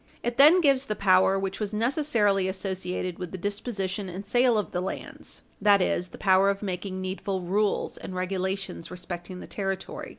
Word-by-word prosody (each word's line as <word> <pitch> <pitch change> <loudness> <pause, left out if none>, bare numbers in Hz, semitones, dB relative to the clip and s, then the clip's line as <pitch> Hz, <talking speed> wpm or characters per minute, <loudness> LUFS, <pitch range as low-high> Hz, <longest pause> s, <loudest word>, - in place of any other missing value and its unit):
It 240 0 -2
then 315 +6 +8
gives 275 -3 +3
the 215 - -1
power 190 -1 +4
which 195 0 -3
was 210 -1 -3
necessarily 225 -6 +2
associated 185 -2 -3
with 180 -2 -5
the 190 - -5
disposition 200 0 -3
and 190 +3 -7
sale 245 +2 +3
of 210 - -2
the 180 - -1
lands 185 - -5 0.2
that 205 -1 +6
is, 180 -1 0
the - - -12
power 190 +1 +4
of 200 +1 -2
making 185 0 -4
needful 190 0 -3
rules 200 +4 0
and 185 - -7
regulations 190 -1 -3
respecting 180 0 -7
the - - -8
territory. 195 -1 -4
195 Hz, 175 wpm, -27 LUFS, 185-210 Hz, 0.2 s, then